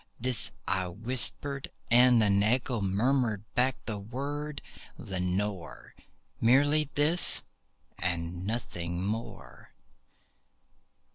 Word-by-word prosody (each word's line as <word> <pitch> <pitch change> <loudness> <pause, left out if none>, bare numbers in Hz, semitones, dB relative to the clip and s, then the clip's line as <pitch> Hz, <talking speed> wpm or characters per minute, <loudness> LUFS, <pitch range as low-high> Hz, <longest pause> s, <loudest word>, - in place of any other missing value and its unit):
This 125 -1 +1 0.2
I 95 -1 +1
whispered, 125 +7 -3 0.2
and 120 -1 +6
an 100 -1 +3
echo 120 +1 +1
murmured 110 +2 +1
back 130 +1 +3
the 105 -3 -4
word, 140 +7 -5 0.4
"Lenore!" 95 0 -3 0.5
Merely 145 +5 +4
this 155 +4 +3 0.6
and 85 0 -2
nothing 90 -5 -3
more. 110 +3 -6
115 Hz, 85 wpm, -29 LUFS, 95-130 Hz, 0.6 s, and